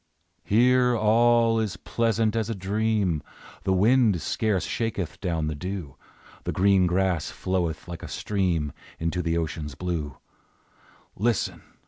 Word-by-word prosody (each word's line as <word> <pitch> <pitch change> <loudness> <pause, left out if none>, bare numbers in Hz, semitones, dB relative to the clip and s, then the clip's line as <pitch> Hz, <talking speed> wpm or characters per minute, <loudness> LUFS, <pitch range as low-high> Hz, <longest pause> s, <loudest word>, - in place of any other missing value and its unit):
Here 125 +2 +4
all 115 +1 +4
is 105 -7 -2
pleasant 115 +1 0
as 110 -1 0
a 115 - -2
dream; 100 -3 0 0.4
The 95 - +1
wind 105 0 +4
scarce 100 +4 0
shaketh 105 -7 -3
down 85 -4 -1
the 75 - -2
dew, 90 -2 -5 0.5
The - - -2
green 95 -1 +4
grass 90 -3 +1
floweth 85 -4 -2
like 85 -1 -7
a - - -7
stream 90 -8 -1 0.2
Into 85 +2 -1
the 85 -1 0
ocean's 80 -3 -3
blue; 80 -6 -3 1.0
Listen! 115 +1 0
95 Hz, 130 wpm, -26 LUFS, 85-110 Hz, 1.0 s, Here